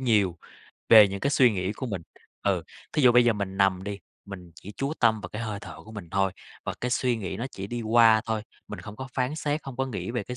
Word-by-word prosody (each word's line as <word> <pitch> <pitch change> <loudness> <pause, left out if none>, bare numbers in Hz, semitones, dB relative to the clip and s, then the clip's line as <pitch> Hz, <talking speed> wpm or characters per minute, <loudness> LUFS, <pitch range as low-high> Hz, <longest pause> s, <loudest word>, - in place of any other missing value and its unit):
nhiều 105 -9 +2 0.5
về 110 -3 +9
những 100 0 -5
cái 140 - +1
suy 125 -5 +5
nghĩ 95 0 -2
của 130 +5 -5
mình. 95 -7 -4 0.4
Ừ, - - +1 0.3
thí 150 - +1
dụ 125 -1 +7
bây 125 0 +6
giờ 120 - +4
mình 100 -2 -4
nằm 95 -2 +2
đi, 100 -1 -4 0.3
mình 90 -3 -10
chỉ 100 +4 -11
chú 140 +2 -2
tâm 110 -3 +3
vào - - -7
cái 110 +2 -5
hơi 105 -3 -4
thở - - -9
của 110 - -12
mình 100 -6 -9
thôi 95 -1 +1 0.3
và - - -3
cái 125 - -2
suy 125 -1 +1
nghĩ 95 -3 -4
nó 120 +5 -3
chỉ 95 -3 -6
đi 120 +2 -4
qua 110 0 +5
thôi, 110 -1 -1 0.3
mình 105 - -7
không 105 +3 -10
có 130 0 -7
phán 130 +3 0
xét, 150 0 -1
hông 135 -3 -7
có 135 - 0
nghĩ 120 -2 -4
về 120 -2 -2
cái 125 +5 -7
110 Hz, 265 wpm, -26 LUFS, 100-125 Hz, 0.5 s, về